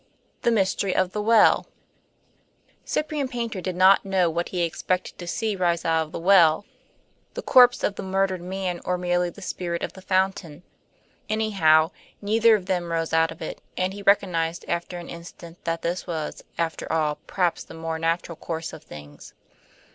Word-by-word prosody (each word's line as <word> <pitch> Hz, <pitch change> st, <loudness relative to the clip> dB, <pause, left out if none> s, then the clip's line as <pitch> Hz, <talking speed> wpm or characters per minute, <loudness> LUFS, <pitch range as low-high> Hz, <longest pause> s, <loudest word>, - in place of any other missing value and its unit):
III. -, -, -41 dB
THE 235 Hz, -, +2 dB
MYSTERY 195 Hz, -2 st, +1 dB
OF 185 Hz, -1 st, +1 dB
THE 210 Hz, -, -3 dB
WELL 225 Hz, +1 st, +4 dB, 1.2 s
Cyprian 300 Hz, -2 st, -2 dB
Paynter 235 Hz, -6 st, -4 dB
did 185 Hz, 0 st, -3 dB
not 190 Hz, +2 st, +6 dB
know 190 Hz, -3 st, +1 dB
what 170 Hz, +2 st, -2 dB
he 180 Hz, -2 st, -1 dB
expected 180 Hz, +2 st, -2 dB
to 175 Hz, -, -7 dB
see 215 Hz, +4 st, -1 dB
rise 175 Hz, -2 st, 0 dB
out 160 Hz, -1 st, +1 dB
of -, -, -19 dB
the -, -, -5 dB
well 175 Hz, 0 st, +5 dB, 0.7 s
the -, -, -5 dB
corpse 245 Hz, -2 st, +6 dB
of -, -, +1 dB
the -, -, -7 dB
murdered 190 Hz, -1 st, 0 dB
man 180 Hz, -1 st, -4 dB
or 180 Hz, -, -1 dB
merely 175 Hz, 0 st, 0 dB
the 200 Hz, +3 st, -12 dB
spirit 170 Hz, -2 st, -3 dB
of -, -, -4 dB
the 190 Hz, -, -12 dB
fountain. 185 Hz, -4 st, -1 dB, 0.7 s
Anyhow, 185 Hz, -7 st, +3 dB, 0.3 s
neither 220 Hz, +2 st, +4 dB
of 195 Hz, -4 st, -4 dB
them 180 Hz, -3 st, -2 dB
rose 165 Hz, -1 st, -1 dB
out 160 Hz, 0 st, +4 dB
of 165 Hz, -, -9 dB
it, -, -, -6 dB, 0.2 s
and 185 Hz, +1 st, 0 dB
he 205 Hz, -, -8 dB
recognized 175 Hz, -5 st, +1 dB
after 170 Hz, +1 st, -3 dB
an 175 Hz, -, -8 dB
instant 170 Hz, 0 st, -11 dB
that 165 Hz, 0 st, -2 dB
this 175 Hz, +3 st, -2 dB
was, 160 Hz, -3 st, -4 dB
after 165 Hz, -1 st, -3 dB
all, 155 Hz, -2 st, 0 dB
perhaps 180 Hz, -3 st, 0 dB
the -, -, -12 dB
more 160 Hz, 0 st, -4 dB
natural 165 Hz, 0 st, -1 dB
course 165 Hz, -1 st, -5 dB
of -, -, -9 dB
things. 75 Hz, -, -12 dB
180 Hz, 180 wpm, -24 LUFS, 165-195 Hz, 1.2 s, not